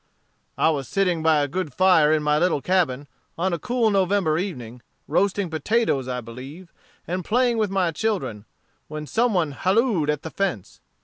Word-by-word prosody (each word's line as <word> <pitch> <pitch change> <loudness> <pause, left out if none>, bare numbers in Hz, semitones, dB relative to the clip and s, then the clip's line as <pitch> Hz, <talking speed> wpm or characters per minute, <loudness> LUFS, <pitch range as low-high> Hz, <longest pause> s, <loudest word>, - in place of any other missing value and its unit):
"I 160 - +3
was 140 -4 -3
sitting 180 -2 0
by 155 -2 +3
a - - -1
good 165 +1 -4
fire 180 -5 +5
in 155 -1 +2
my 150 0 +2
little 175 -3 +2
cabin, 145 -5 0 0.3
on 180 +2 0
a 170 - -2
cool 240 -1 +1
November 190 -5 +1
evening, 125 - -6 0.3
roasting 200 0 +1
potatoes 160 - 0
I 125 -1 -3
believe, 135 +10 -11 0.3
and 180 +1 -3
playing 240 +3 +1
with 215 -2 +1
my 190 -3 +1
children, 165 - -3 0.4
when 155 0 -6
some 225 +6 +1
one 165 -5 +1
halloed 190 - +1
at 150 -1 -1
the 160 - -6
fence. 190 - -3
170 Hz, 175 wpm, -23 LUFS, 150-195 Hz, 0.4 s, fire